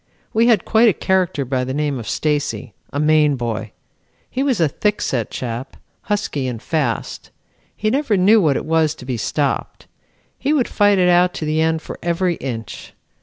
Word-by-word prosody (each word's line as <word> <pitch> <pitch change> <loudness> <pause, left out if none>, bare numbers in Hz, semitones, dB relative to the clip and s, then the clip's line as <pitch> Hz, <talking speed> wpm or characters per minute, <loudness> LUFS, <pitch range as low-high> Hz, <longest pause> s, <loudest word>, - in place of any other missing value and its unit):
We 230 +2 +3
had 230 -3 +3
quite 225 +1 +5
a - - +2
character 185 -8 0
by 130 0 -1
the 130 +1 -3
name 145 -3 -1
of 115 - -6
Stacy, 145 -5 -1 0.2
a 145 - -3
Maine 150 -1 +4
boy. 115 -3 -4 0.6
He 260 - -2
was 265 -7 +1
a 165 - +4
thickset 140 - -1
chap, 120 +1 -5 0.3
husky 200 -10 -1
and 120 -3 -4
fast. 140 -4 -2 0.5
He 215 0 0
never 265 -6 +1
knew 205 +4 +5
what 150 -6 +2
it - - -4
was 160 -1 +2
to 125 - -12
be 130 -1 -2
stopped. 140 +5 -2 0.5
He 285 +3 +1
would 270 -6 +2
fight 205 -1 +3
it 180 -1 +3
out 180 0 +4
to 155 - -4
the 155 +1 +1
end 160 0 +1
for - - -8
every 175 +1 0
inch. 115 -6 -7
155 Hz, 185 wpm, -20 LUFS, 130-200 Hz, 0.6 s, quite